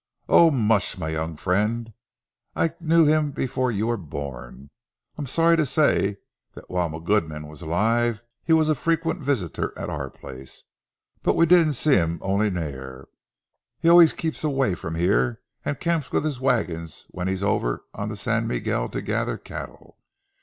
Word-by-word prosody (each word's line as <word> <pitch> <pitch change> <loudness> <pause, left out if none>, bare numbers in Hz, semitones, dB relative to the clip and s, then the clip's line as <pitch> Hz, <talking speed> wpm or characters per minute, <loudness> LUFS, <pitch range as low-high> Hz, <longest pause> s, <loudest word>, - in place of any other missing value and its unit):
"Ower 170 - +7
much, 110 -6 +1
ma 85 - -4
young 80 0 -3
freend. 105 +6 -1 0.6
I 165 - +2
kent 165 -1 +3
him 150 -2 +2
afore 130 0 0
ye 105 -1 -1
were 120 +1 0
born. 70 - -8 0.4
I'm 145 -3 -5
sorry 165 +5 +3
tae 155 - +3
say 125 -8 +2 0.4
that - - -13
while 90 -2 0
ma 80 - -6
gudeman 80 -3 -1
was 75 +1 -12
alive, 110 +7 +1 0.2
he - - -2
was 160 -1 +5
a 155 - +3
frequent 165 +4 -1
visitor 130 - -2
at - - -5
oor - - -4
place. 65 0 -11 0.6
But - - +2
we 165 - +5
dinna 165 -3 +5
see 150 +4 +2
him 85 -2 0
ony 100 +2 +1
mair. 65 -7 -6 0.7
He 165 - +4
aye 170 -1 +9
keeps 160 0 -4
awa' 135 - +1
frae 80 -1 -5
here, 110 +6 +2 0.2
and 145 - -3
camps 165 -5 -1
wi' - - +1
his 150 -4 -3
wagons 90 - -1
when 90 +1 -4
he's 95 0 -2
ower - - 0
on - - -4
the - - -5
San - - 0
Miguel - - -1
to - - -5
gather - - -1
cattle. - - -10
110 Hz, 170 wpm, -24 LUFS, -, 0.7 s, aye